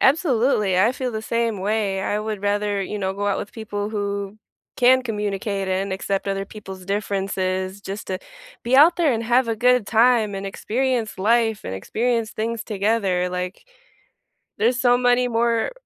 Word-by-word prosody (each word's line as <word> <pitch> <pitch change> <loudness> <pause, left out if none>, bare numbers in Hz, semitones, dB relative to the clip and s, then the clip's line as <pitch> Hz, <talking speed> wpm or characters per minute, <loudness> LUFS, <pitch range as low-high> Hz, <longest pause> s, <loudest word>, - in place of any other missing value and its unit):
Absolutely, 250 - +3
I 225 +6 +4
feel 255 -1 -3
the 220 0 -4
same 230 -2 -1
way. 200 -1 0
I 205 - -1
would 215 -1 -4
rather, 205 0 0
you 210 +2 -4
know, 190 -1 -1
go 200 +1 -3
out 200 - +1
with 205 - -6
people 205 -2 -4
who 200 -1 -3 0.4
can 255 +1 +5
communicate 205 -3 -2
and 190 +1 -1
accept 195 +1 -2
other 195 0 -1
people's 190 -2 -10
differences 195 -1 -2
just 200 +1 -7
to 185 - -2 0.5
be 240 +2 +1
out 320 +5 +7
there 325 -6 +3
and 230 -1 -1
have 240 +2 +2
a 225 - -1
good 250 -1 +3
time, 225 -2 +3
and 195 0 -5
experience 235 +3 -1
life 225 +2 +2
and 95 - -4
experience 230 - -1
things 225 +1 -3
together. 200 -3 0
Like, 180 - -5 0.9
there's 240 +3 +2
so 245 -1 +4
many 245 0 +3
more 230 - +1
210 Hz, 170 wpm, -22 LUFS, 195-235 Hz, 0.9 s, out